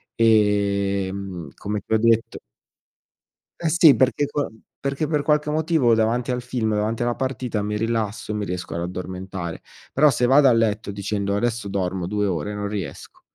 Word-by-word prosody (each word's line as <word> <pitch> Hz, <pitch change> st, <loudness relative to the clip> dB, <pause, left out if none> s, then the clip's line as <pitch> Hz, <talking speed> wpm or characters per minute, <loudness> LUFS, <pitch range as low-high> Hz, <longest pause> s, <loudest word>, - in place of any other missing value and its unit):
ehm, 100 Hz, -5 st, +1 dB
come 105 Hz, +1 st, -3 dB
ti -, -, -3 dB
ho -, -, +5 dB
detto 115 Hz, 0 st, +2 dB, 1.2 s
E 170 Hz, -, 0 dB
sì, 160 Hz, -4 st, +6 dB
perché 130 Hz, +4 st, +2 dB
co 145 Hz, 0 st, -2 dB, 0.3 s
perché 140 Hz, +2 st, -2 dB
per 150 Hz, -2 st, +1 dB
qualche 150 Hz, -1 st, +2 dB
motivo, 155 Hz, -5 st, +2 dB
davanti 115 Hz, +3 st, +1 dB
al 125 Hz, 0 st, -1 dB
film, 120 Hz, -3 st, -2 dB
davanti 105 Hz, +2 st, -1 dB
alla 120 Hz, 0 st, 0 dB
partita, 130 Hz, -4 st, -2 dB
mi 105 Hz, +1 st, -2 dB
rilasso, 110 Hz, -1 st, -2 dB
mi 105 Hz, -1 st, -2 dB
riesco 90 Hz, -1 st, -5 dB
ad 85 Hz, -, -2 dB
addormentare. 90 Hz, -1 st, -5 dB, 0.3 s
Però 150 Hz, +3 st, +5 dB
se 125 Hz, -1 st, +1 dB
vado 135 Hz, +3 st, +6 dB
a 130 Hz, -, +6 dB
letto 110 Hz, -3 st, 0 dB
dicendo: 100 Hz, 0 st, -2 dB
"Adesso 115 Hz, +1 st, -1 dB
dormo 95 Hz, -2 st, -2 dB
2 105 Hz, +2 st, 0 dB
ore". 95 Hz, +2 st, -2 dB
Non 105 Hz, 0 st, -3 dB
riesco. 95 Hz, -9 st, -7 dB
110 Hz, 165 wpm, -23 LUFS, 100-125 Hz, 1.2 s, sì